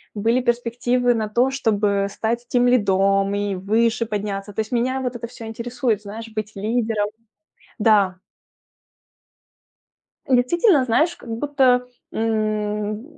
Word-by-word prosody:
были 230 +5 +1
перспективы 245 +1 +1
на 220 -2 -2
то, 245 +5 +2
чтобы 205 -6 +1
стать 235 +4 -3
тимлидом 200 -5 +2
и 205 -1 -1
выше 225 +5 +1
подняться. 205 -1 -4
То - - -6
есть 215 - -7
меня 255 +2 0
вот 250 -1 -3
это 235 0 -5
всё 230 -1 -10
интересует, 230 -1 -2
знаешь, 220 +2 -8
быть 215 -1 -4
лидером. 215 0 -1 0.7
Да. 205 -4 +3 2.1
Действительно, 275 - +3
знаешь, 310 +9 +2
как 240 - -13
будто, 250 0 +2 0.3
м, 215 -1 -1
225 Hz, 120 wpm, -22 LUFS, 210-245 Hz, 2.1 s, Да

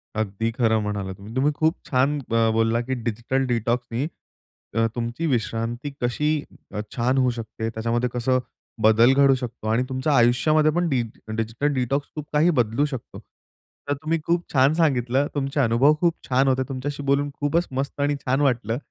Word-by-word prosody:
अगदी 110 +1 -1
खरं 110 -3 +3
म्हणालात. 100 -2 -3 0.2
तुम्ही 140 +3 +2
खूप 160 +2 +2
छान 140 +3 +1
ब - - -4 0.2
बोलला, 115 +1 +2
की 130 +2 -3
डिजिटल 120 +4 -1
डिटॉक्सनी, 120 +2 -1 0.7
अ, 115 0 +3
तुमची 120 +6 -3
विश्रांती 120 +1 -2
कशी 125 +5 0 0.4
अ, - - -3 0.2
छान 125 +2 +1
होऊ 130 -1 +3
शकते. 110 0 -4
त्याच्यामध्ये 115 +2 -1
कसं 130 +1 +1 0.4
बदल 115 +4 +6
घडू 140 0 +5
शकतो 125 -3 -6
आणि 115 +3 +2
तुमच्या 130 +3 0
आयुष्यामध्ये 150 +6 +4
पण 175 -1 +1
डिज 120 -5 0 0.3
डिजिटल 115 +6 -1
डिटॉक्स 135 +2 -1
खूप 150 -1 -6
काही 150 +4 +4
बदलू 115 +5 +2
शकतो. 130 -5 -7 0.7
तर - - +3
तुम्ही 155 +3 -2
खूप 170 0 +1
छान 135 +1 +4
सांगितलं. 135 -4 +2
तुमचे 140 0 -1
अनुभव 125 +4 +4
खूप 170 -2 +3
छान 130 +1 +3
होते. 130 0 +2
तुमच्याशी 140 +2 -4
बोलून 140 +1 +1
खूपच 160 +4 +1
मस्त 135 +2 -3
आणि 145 0 +1
छान 130 +2 +1
वाटलं. 120 -5 +1
130 Hz, 165 wpm, -24 LUFS, 115-145 Hz, 0.7 s, बदल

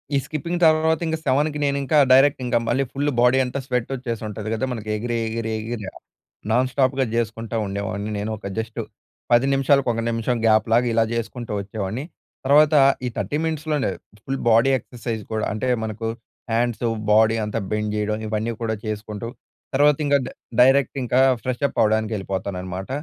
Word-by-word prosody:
ఈ - - +4
స్కిప్పింగ్ 165 +4 -3
తర్వాత 160 0 +3
ఇంకా 160 0 -1
7కి 150 +2 +1
నేను 140 0 +1
ఇంకా 150 +3 +2
డైరెక్ట్ 135 +1 +5
ఇంకా 120 -1 +2
మళ్ళీ 130 +3 +2
ఫుల్ 145 +2 0
బాడీ 125 +2 +5
అంతా 125 +2 -4
స్వెట్ 125 -3 -1
వచ్చేసి 120 -3 -4
ఉంటది 105 0 -5
కదా 130 +4 -1
మనకి 110 -3 -5
ఎగిరి, 120 +2 -2
ఎగిరి, 110 0 -3
ఎగిర 115 0 -5 0.7
నాన్ 125 +3 +3
స్టాప్‌గా 130 0 +1
చేసుకుంటా 115 0 -2
ఉండేవాడిని 100 +1 -4
నేను, 105 +2 -3
ఒక 100 - -7
జస్ట్ 110 +1 -4 0.5
10 120 +2 +5
నిమిషాలకు 135 -1 +3
ఒక 115 - -2
నిమిషం 115 +2 -1
గ్యాప్‌లాగా 115 +2 +3
ఇలా 115 0 +4
చేసుకుంటూ 115 0 -4
వచ్చేవాడిని. 100 +4 -4 0.4
తర్వాత 150 +2 +5 0.3
ఈ - - 0
30 145 - -1
మినిట్స్ 160 -1 -3
లోనే 145 -8 +1 0.3
ఫుల్ 135 +2 -3
బాడీ 115 +5 +5
ఎక్సర్సైజ్ 115 -1 -6
కూడా 110 -1 -1
అంటే 110 +4 -2 0.2
మనకు 110 +1 -4 0.5
హండ్స్, 120 +1 0 0.3
బాడీ 110 +1 +5
అంతా 105 +2 -2
బెండ్ 105 0 -1
చేయడం 105 0 -1
ఇవన్నీ 110 +2 -1
కూడా 110 -1 -1
చేసుకుంటూ, 105 +1 -5 0.5
తర్వాత 145 +1 +4
ఇంకా 145 0 +4
డై - - -7 0.3
డైరెక్ట్ 135 +2 +4
ఇంకా 125 +1 +1 0.2
ఫ్రెష్ 130 +1 -3
అప్ - - -12
అవ్వడానికి 110 0 +1
వెళ్ళిపోతాను 95 -1 -4
అన్నమాట. 95 +3 -6
115 Hz, 170 wpm, -22 LUFS, 110-135 Hz, 0.7 s, డైరెక్ట్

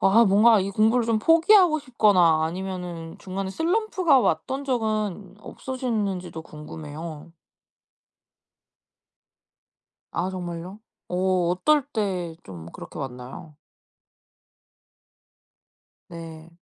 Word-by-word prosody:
아 220 +5 +5
뭔가 215 +3 +5
이 195 - -2
공부를 225 +4 +2
좀 225 -2 +2
포기하고 330 - +5
싶거나 200 - +3
아니면은 175 -1 -5
중간에 190 0 -5
슬럼프가 345 - +2
왔던 255 - -1
적은 215 -6 -2
없으셨는지도 210 -10 -4
궁금해요. 155 +1 -9 2.8
아 180 +2 -1
정말요? 180 +2 -6 0.3
어 180 - -4 0.3
어떨 280 +11 +2
때 185 -6 -2
좀 85 -4 -10
그렇게 - - -9
왔나요? 130 +3 -8 2.5
네. 165 -1 -10
190 Hz, 200 characters per minute, -24 LUFS, 165-235 Hz, 2.8 s, 아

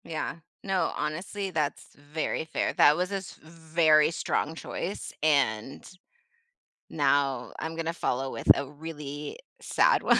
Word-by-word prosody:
Yeah, 165 +1 -4 0.3
no, 195 -2 +1
honestly, 185 +6 -3
that's 150 -4 -2
very 150 +2 -3
fair, 160 - -1
that 150 +1 +6
was 180 +2 -1
a - - -1
s 190 -2 -8
very 160 -1 +3
strong 160 -1 -1
choice 185 +3 -5
and 135 -6 +1 1.0
now 135 -3 +1
I'm 160 +1 -4
gonna 165 0 -2
follow 135 -5 -1
with - - +5
a 140 - -3
really 150 - -7 0.2
sad - - +3
one - - +5
155 Hz, 135 wpm, -28 LUFS, 145-165 Hz, 1.0 s, that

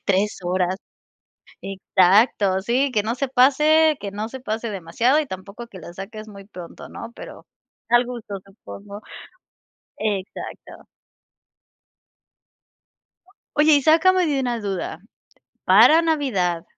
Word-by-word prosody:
3 200 +2 0
horas. 180 +1 0 0.9
Exacto, 195 +1 +2
sí, 255 +6 0
que 210 - +1
no 225 +3 -2
se 275 +1 -2
pase 300 +4 +4
que 200 - -5
no 210 +2 -5
se 260 +1 -9
pase 225 -1 -4
demasiado 210 - +1
y 300 - -4
tampoco 200 +3 -9
que 190 - -12
la 170 +1 -10
saques 215 +4 -9
muy 200 -1 -12
pronto, 180 -4 -11
¿no? 230 +1 -9
Pero - - -11 0.4
al 240 +1 +4
gusto, 230 -5 -7
supongo. 200 0 -11 1.0
Exacto. 205 -3 -5 2.7
Oye, 305 +1 +5
y 285 - +1
sácame 360 +4 +4
de 290 -4 0
una 245 -3 -2
duda. 190 -5 -4 0.7
Para 325 +2 +6
Navidad 210 - 0
215 Hz, 120 wpm, -22 LUFS, 195-265 Hz, 2.7 s, Para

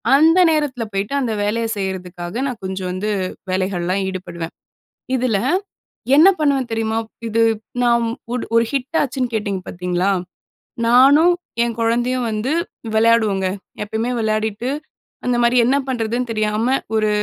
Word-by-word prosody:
அந்த 325 +5 +5
நேரத்தில 290 -6 0
போய்ட்டு 195 +6 -2
அந்த 235 -4 -1
வேலைய 230 +3 0
செய்யிறதுக்காக, 180 -2 -5
நான் 245 -6 -5
கொஞ்சம் 190 -1 -3
வந்து 190 +4 -3 0.4
வேலைகள்லாம் 185 0 0
ஈடுபடுவேன். 175 -3 -6 0.6
இதுல, 245 -5 +1 0.8
என்ன 315 +6 +8
பண்ணுவேன் 275 -5 +1
தெரியுமா? 225 0 -1
ப் - - -28
இது 230 +1 +2 0.4
நாம் 235 -1 +3 0.3
ஒரு 250 - -2
ஒரு 230 - +5
ஹிட் 280 +3 -1
ஆச்சுன்னு 255 -3 -2
கேட்டீங்க 200 -3 -2
பாத்தீங்களா, 180 +1 -1 0.8
நானும் 280 +8 +6 0.3
என் 235 -1 -2
கொழந்தையும் 240 +2 +1
வந்து, 215 +6 -2 0.4
வெளையாடுவோங்க. 220 -4 +3 0.4
எப்பயுமே 220 +4 -2
விளையாடிட்டு, 215 +1 -1 0.6
அந்தமாரி, 240 0 +2
என்ன 265 +3 +3
பண்ணுறதுன்னு 240 0 -1
தெரியாம 215 +4 +1 0.2
ஒரு 215 -1 +2
225 Hz, 125 wpm, -20 LUFS, 200-250 Hz, 0.8 s, என்ன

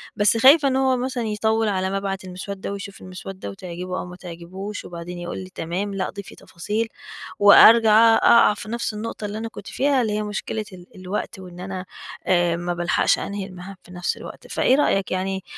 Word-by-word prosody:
بس 205 +2 +3
خايفة 280 +5 +7
إن 265 - +1
هو 265 -1 +2
مثلًا 250 -1 -2
يطوّل 220 +1 0
على 190 -1 -1
ما 195 - -1
ابعت 195 -1 -3
المسودة 190 +2 -6
ويشوف 200 0 -7
المسودة 185 - -8
وتعجبه 180 - -6
أو - - -5
ما 180 0 -10
تعجبهوش، 180 +3 -8
وبعدين 175 +1 -7
يقول 175 0 -5
لي 185 0 -7
تمام، 185 +5 -3
لا، 195 -1 -2
ضيفي 200 -1 -9
تفاصيل، 210 +6 -3 0.5
وأرجع 225 +2 +8
أق - - 0
أقع 235 -2 +6
في 210 +1 -9
نفس 235 -1 -2
النقطة 215 0 -5
اللي 205 +1 -4
أنا 225 - -4
كُنت 205 - -11
فيها، 275 -1 +1
اللي 220 -3 -1
هي 210 0 -1
مشكلة 210 +1 -4
ال 180 -1 -12
الوقت 190 +2 -5
وإن 180 -1 -11
أنا 185 0 -6 0.4
آآ، 175 -2 +3
ما 175 +1 -3
بالحقش 175 0 +1
أنهي 200 -1 -4
المهام 185 0 -10
في - - -16
نفس 180 0 -2
الوقت. - - -10
فإيه 260 - +2
رأيك 195 -9 +1
يعني؟ 190 0 -2
195 Hz, 195 wpm, -23 LUFS, 180-220 Hz, 0.5 s, وأرجع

